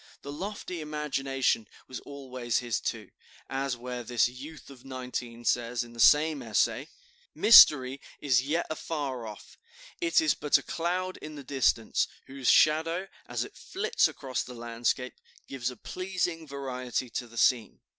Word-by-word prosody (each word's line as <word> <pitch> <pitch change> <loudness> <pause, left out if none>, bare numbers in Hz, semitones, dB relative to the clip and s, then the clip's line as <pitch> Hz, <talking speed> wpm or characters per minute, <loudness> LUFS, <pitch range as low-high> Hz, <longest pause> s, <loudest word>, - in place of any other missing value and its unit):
The 140 - -6
lofty 185 +1 -5
imagination 135 -6 -1 0.2
was 130 - -6
always 130 -4 -4
his, 120 -3 -1
too, - - -4 0.4
as 135 -1 -1
where 125 0 -5
this 120 0 +2
youth 140 +4 -10
of 125 -3 -14
nineteen 125 -2 -6
says 120 0 +1
in 120 0 -13
the 115 - -12
same 150 +4 +5
essay: - - 0 0.5
"Mystery 140 - +8 0.2
is 130 -4 +3
yet 155 +6 -1
afar 140 -7 -4
off, 105 -1 -11 0.4
it 345 -1 +3
is 320 -1 +3
but 150 - +3
a - - -8
cloud 180 +2 -2
in 155 0 -9
the 145 - -8
distance, 130 -4 +1 0.2
whose 135 -1 -2
shadow, 165 +5 +3 0.2
as - - -2
it - - -11
flits 435 +5 0
across 130 -2 -4
the 125 - -8
landscape, 120 +2 -2 0.3
gives 130 -2 -3
a 125 - -10
pleasing 180 -3 -3
variety 130 -2 -4
to 120 +2 -4
the 115 0 -14
scene. 115 -1 +2
135 Hz, 155 wpm, -29 LUFS, 125-155 Hz, 0.5 s, Mystery